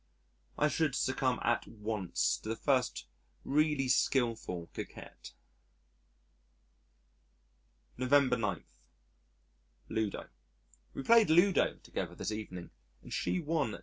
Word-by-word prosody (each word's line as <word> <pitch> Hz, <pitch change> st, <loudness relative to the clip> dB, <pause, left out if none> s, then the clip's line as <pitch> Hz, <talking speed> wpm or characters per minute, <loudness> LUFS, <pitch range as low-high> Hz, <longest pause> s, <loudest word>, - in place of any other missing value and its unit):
I 150 Hz, -, +3 dB
should 150 Hz, -1 st, 0 dB
succumb 130 Hz, -1 st, 0 dB
at 120 Hz, -2 st, +1 dB
once 105 Hz, -4 st, -1 dB
to 110 Hz, -, -8 dB
the 110 Hz, -, -1 dB
first 130 Hz, 0 st, 0 dB, 0.4 s
really 150 Hz, -2 st, +2 dB
skilful 115 Hz, -10 st, 0 dB
coquette. -, -, -9 dB, 2.6 s
November 130 Hz, 0 st, +4 dB
9. 105 Hz, -7 st, -2 dB, 1.3 s
Ludo 110 Hz, -2 st, -2 dB, 0.7 s
We 135 Hz, -, -4 dB
played 230 Hz, 0 st, +6 dB
Ludo 175 Hz, +4 st, +4 dB
together -, -, -5 dB
this -, -, -3 dB
evening 100 Hz, -5 st, -6 dB, 0.3 s
and -, -, -9 dB
she -, -, 0 dB
won 150 Hz, -8 st, -1 dB
2s. -, -, -7 dB
130 Hz, 105 wpm, -32 LUFS, 110-150 Hz, 2.6 s, played